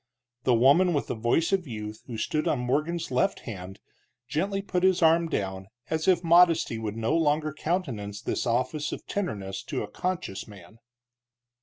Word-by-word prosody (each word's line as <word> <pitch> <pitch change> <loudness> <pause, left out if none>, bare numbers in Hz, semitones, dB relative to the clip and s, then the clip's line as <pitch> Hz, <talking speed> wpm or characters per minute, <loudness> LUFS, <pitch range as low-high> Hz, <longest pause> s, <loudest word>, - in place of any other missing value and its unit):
The 125 - +4
woman 145 +9 +5
with 145 - 0
the - - -3
voice 120 - +1
of 185 -4 +1
youth, 105 -2 -6
who 115 - -5
stood 150 +7 -1
on - - +2
Morgan's 150 +7 -1
left 130 0 +1
hand, 95 -3 -8 0.5
gently 195 +8 -1
put 180 -2 -1
his 185 -1 +3
arm 165 +1 +4
down, 95 -4 -3 0.2
as 160 0 -1
if 180 -2 +4
modesty 165 -8 +4
would 110 -1 -4
no 115 +7 0
longer 155 -1 +1
countenance 130 - -3
this - - -2
office 130 +5 0
of - - -6
tenderness 100 - -3
to - - -3
a - - -5
conscious 180 - -3
man. 100 +1 -14
145 Hz, 170 wpm, -27 LUFS, 110-170 Hz, 0.5 s, woman